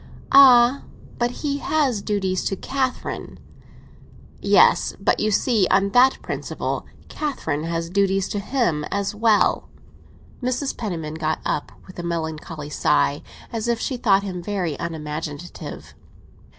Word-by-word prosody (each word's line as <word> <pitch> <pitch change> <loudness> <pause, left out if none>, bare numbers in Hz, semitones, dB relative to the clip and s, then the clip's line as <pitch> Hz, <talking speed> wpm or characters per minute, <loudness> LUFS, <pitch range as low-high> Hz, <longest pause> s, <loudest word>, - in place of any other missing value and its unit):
"Ah, 260 -1 +7 0.4
but 240 0 +2
he 280 +3 -3
has 275 -9 0
duties 190 -3 -1
to 195 - 0
Catherine." 260 +4 -3 1.0
"Yes, - - +4
but - - +1
you 215 - +1
see 215 -1 +2
that - - +4
on 195 +1 +2
that 255 +4 +5
principle - - -4 0.2
Catherine 160 - -3
has 165 0 -2
duties 195 0 +1
to 205 - -2
him 200 - 0
as 200 0 -2
well." 215 0 +2 0.7
Mrs. 255 +2 -1
Penniman 165 -9 -4
got 160 0 0
up, 145 - -2
with 185 - -12
a - - -4
melancholy 160 -2 -4
sigh, 145 -1 +1 0.3
as 225 0 -2
if 235 -1 +1
she 260 - -2
thought 200 -5 +3
him 185 -3 -5
very 180 -5 -2
unimaginative. 155 0 -6
200 Hz, 135 wpm, -22 LUFS, 165-240 Hz, 1.0 s, Ah